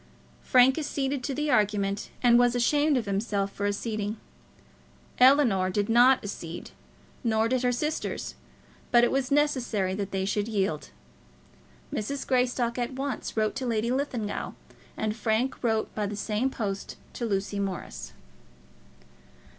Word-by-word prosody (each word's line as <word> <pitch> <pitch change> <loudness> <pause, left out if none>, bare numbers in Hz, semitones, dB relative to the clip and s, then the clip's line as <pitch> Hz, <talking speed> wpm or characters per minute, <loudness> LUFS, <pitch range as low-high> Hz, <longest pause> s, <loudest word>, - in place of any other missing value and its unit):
Frank 260 +3 +5
acceded 280 -3 -2
to 275 - -2
the 300 0 0
argument, 205 -3 +1
and 240 -1 +6
was 245 0 +3
ashamed 290 +4 +3
of 235 - -1
himself 200 0 -1
for 205 +1 -2
acceding. 210 +1 -2 1.0
Ellinor 250 -8 +5
did 205 +2 -1
not 245 +3 +5
accede, 175 -4 -7 0.5
nor 220 -1 +2
did 255 +1 +1
her 250 -1 +2
sisters, 300 +6 -3 0.6
but 240 -1 +5
it 240 - +3
was 265 -1 0
necessary 255 -10 +1
that 200 0 -3
they 190 -1 -2
should 205 +1 -1
yield. 195 -8 -1 1.0
Mrs. 275 +2 -3
Greystock 250 -1 +1
at 240 +2 -2
once 270 -3 -4
wrote 215 -1 +1
to 260 -1 -3
Lady 230 0 0
Linlithgow, 255 -6 -2 0.4
and 215 -1 -1
Frank 225 +4 -1
wrote 220 -2 0
by 210 -1 -1
the 205 - -4
same 215 +5 -1
post 200 -6 -4 0.2
to 235 - -3
Lucy 200 0 -1
Morris. 195 -2 -5
230 Hz, 140 wpm, -27 LUFS, 205-255 Hz, 1.0 s, and